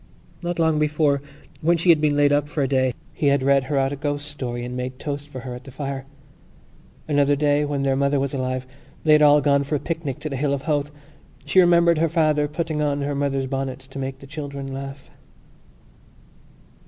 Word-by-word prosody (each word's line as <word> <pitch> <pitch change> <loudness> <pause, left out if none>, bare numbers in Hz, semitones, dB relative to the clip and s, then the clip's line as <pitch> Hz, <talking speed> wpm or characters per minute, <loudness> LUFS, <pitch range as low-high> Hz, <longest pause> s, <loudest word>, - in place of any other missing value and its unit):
Not 175 0 -3
long 160 -2 +2
before, 150 -2 +2 0.4
when 170 +2 +3
she 170 +2 +1
had 160 -3 +6
been 150 -1 +2
laid 145 0 +4
up 145 0 +1
for 145 -1 -1
a - - +1
day, 130 -1 +2 0.2
he 145 - 0
had 140 -1 +3
read 135 -1 +3
her 140 +1 -1
out 135 +1 +1
a - - -3
ghost 145 +1 -3
story 120 -4 -5
and 125 0 -6
made 125 0 -4
toast 145 0 -5
for 130 -3 -7
her 125 -1 -6
at 125 +1 -9
the 135 - -11
fire. 135 0 -5 1.0
Another 145 -1 +3
day, 145 0 +2
when 145 -1 -2
their 135 -1 +2
mother 140 +1 +1
was 135 0 -2
alive, 130 -1 -2 0.4
they 155 - +3
had 150 - +6
all 150 0 +6
gone 140 0 +3
for 145 +2 -2
a - - 0
picnic 155 -3 -4
to 155 - -3
the 135 - -4
Hill 140 +1 +1
of 135 - -7
Howth. 145 -2 0 0.6
She 190 - +3
remembered 170 -2 +5
her 165 0 +2
father 155 -2 +2
putting 155 0 -3
on 145 -1 0
her 145 +1 -1
mother's 140 -1 -1
bonnet 135 -1 -3
to 135 +1 -9
make 135 0 -4
the 135 - -13
children 140 -2 -6
laugh. 135 0 -8
145 Hz, 215 wpm, -23 LUFS, 135-150 Hz, 1.0 s, had